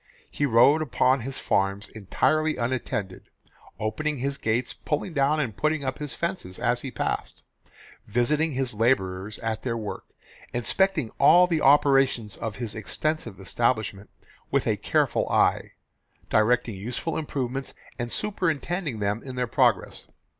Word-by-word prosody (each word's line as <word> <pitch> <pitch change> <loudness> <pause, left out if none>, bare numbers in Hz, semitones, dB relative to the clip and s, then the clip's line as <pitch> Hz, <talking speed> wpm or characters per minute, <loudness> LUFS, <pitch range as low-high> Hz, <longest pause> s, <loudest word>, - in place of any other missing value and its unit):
He 145 - 0
rode 135 +6 +5
upon 130 -2 +2
his 130 +2 -5
farms 100 +1 0
entirely 155 +9 0
unattended, 115 -6 -3 0.5
opening 145 +8 -2
his 140 +2 -2
gates, 115 +3 0
pulling 155 +4 -3
down 145 +1 +2
and 120 -9 -2
putting 155 +2 0
up 130 +1 -3
his 150 -2 -5
fences 170 - -3
as 120 0 0
he 135 - -5
passed, - - -3 0.6
visiting 150 +8 +1
his 130 -2 -1
labourers 105 -3 0
at 110 -1 -2
their 115 -1 -2
work, 105 -2 -6 0.5
inspecting 155 - +1
all 175 +6 +7
the 165 -3 0
operations 135 -6 +4
of 110 -3 -5
his 115 -2 -5
extensive 135 - -3
establishment 105 0 -1 0.4
with - - +1
a - - +2
careful - - +1
eye, - - +2 0.6
directing 115 +2 +3
useful 120 - -4
improvements 135 -3 -3 0.2
and 120 -1 -3
superintending 175 - -1
them 105 +2 -1
in 130 -2 -8
their 125 0 0
progress. 115 - +1
125 Hz, 140 wpm, -26 LUFS, 110-150 Hz, 0.6 s, all